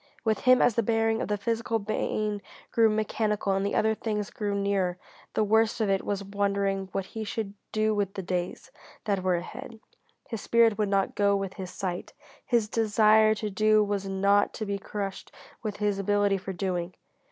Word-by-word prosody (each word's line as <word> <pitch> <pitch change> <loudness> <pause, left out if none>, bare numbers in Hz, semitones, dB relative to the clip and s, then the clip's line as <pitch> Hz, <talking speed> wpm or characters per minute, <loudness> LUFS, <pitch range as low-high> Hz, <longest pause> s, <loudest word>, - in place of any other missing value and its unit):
With 220 -1 +1
him, 255 0 +5
as 245 - +4
the 230 - +2
bearing 225 0 +1
of - - -2
the 210 - 0
physical 230 +1 -1
pain 210 0 -2 0.3
grew 225 -1 +4
mechanical 215 -1 0
and 195 0 0
the 200 - -1
other 220 0 +3
things 210 -2 -3
grew 205 -2 -2
nearer, 200 -3 0 0.4
the - - +3
worst 220 +2 +2
of 215 -3 +1
it 195 - +1
was 200 -1 -2
wondering 200 -1 -1
what 195 -1 -2
he 220 - -3
should 210 -1 -4 0.2
do 215 0 +1
with 205 -1 -1
the 195 - -4
days 180 +8 -3 0.3
that 200 -3 0
were 185 -1 +2
ahead. 230 +6 -7 0.5
His 225 -4 -5
spirit 230 -2 +3
would 210 -2 +1
not 195 -1 +1
go 200 0 +3
with 195 -1 -3
his 190 -3 -7
sight. 180 -2 -5 0.3
His 235 -3 +1
desire 215 0 +4
to 210 -1 -4
do 215 +2 +4
was 200 -1 -2
not 200 +1 +2
to 215 - -3
be 200 -1 -2
crushed 195 0 -5 0.3
with 215 -3 -4
his 205 -1 0
ability 205 0 +2
for 190 - -6
doing. 180 -1 -3
205 Hz, 190 wpm, -27 LUFS, 195-220 Hz, 0.5 s, him